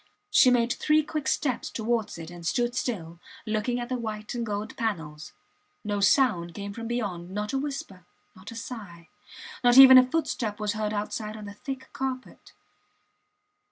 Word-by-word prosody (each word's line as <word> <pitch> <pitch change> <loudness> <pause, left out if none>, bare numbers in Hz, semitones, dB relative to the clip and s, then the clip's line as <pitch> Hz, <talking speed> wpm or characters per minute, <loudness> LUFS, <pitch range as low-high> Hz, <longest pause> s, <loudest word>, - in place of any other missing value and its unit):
She 255 - +7
made 240 -1 +3
three 305 0 +2
quick 305 -1 -4
steps 260 -5 0
towards 225 -3 -2
it 165 0 -8
and 175 -1 -10
stood 240 +8 0
still, 170 -8 -3 0.3
looking 220 +3 -1
at 240 - -4
the 255 -1 -3
white 215 -2 -5
and 240 -1 -2
gold 210 -1 -4
panels. 160 -9 -4 0.5
No 205 -1 -2
sound 195 - +3
came 200 0 -6
from 230 +1 -6
beyond, 200 -8 -3
not 210 +5 -4
a 270 - +1
whisper, 235 - -6 0.3
not 185 +1 -11
a 230 - -9
sigh; 200 -8 -8 0.5
not 245 +1 +5
even 260 -1 +11
a 255 0 +3
footstep 235 -9 -2
was 210 0 -1
heard 215 -1 -2
outside 215 +1 -4
on 210 - -8
the 205 - -8
thick 260 +3 -8
carpet. 260 -1 -5
220 Hz, 170 wpm, -27 LUFS, 200-250 Hz, 0.5 s, even